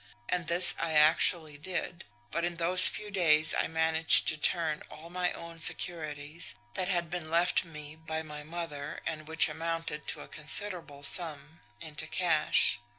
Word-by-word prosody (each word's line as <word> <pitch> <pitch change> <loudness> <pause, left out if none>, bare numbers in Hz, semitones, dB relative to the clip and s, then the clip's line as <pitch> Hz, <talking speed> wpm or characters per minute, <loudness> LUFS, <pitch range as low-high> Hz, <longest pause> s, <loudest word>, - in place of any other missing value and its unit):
And 175 -2 -4
this 175 +2 +2
I 165 -1 -4
actually 155 0 +2
did; 180 +1 -7 0.3
but 170 - -4
in 175 0 -4
those 175 +2 +9
few 210 -1 -5
days 160 -5 +1
I - - -2
managed 160 0 +2
to - - -1
turn 155 0 -1
all 165 +2 -13
my 180 0 -3
own 170 0 -12
securities, 155 -2 +2 0.2
that 185 - -4
had 175 -3 -3
been 175 -3 -7
left 170 +2 +1
me 150 -2 -11
by 160 0 -7
my 150 -1 -11
mother 150 -2 -9
and 155 -1 -7
which 160 0 +2
amounted 165 -2 -6
to - - -3
a - - -12
considerable 155 -2 -1
sum, 160 -1 +3 0.2
into 155 -1 -7
cash. 155 -7 0
160 Hz, 160 wpm, -27 LUFS, 155-175 Hz, 0.3 s, those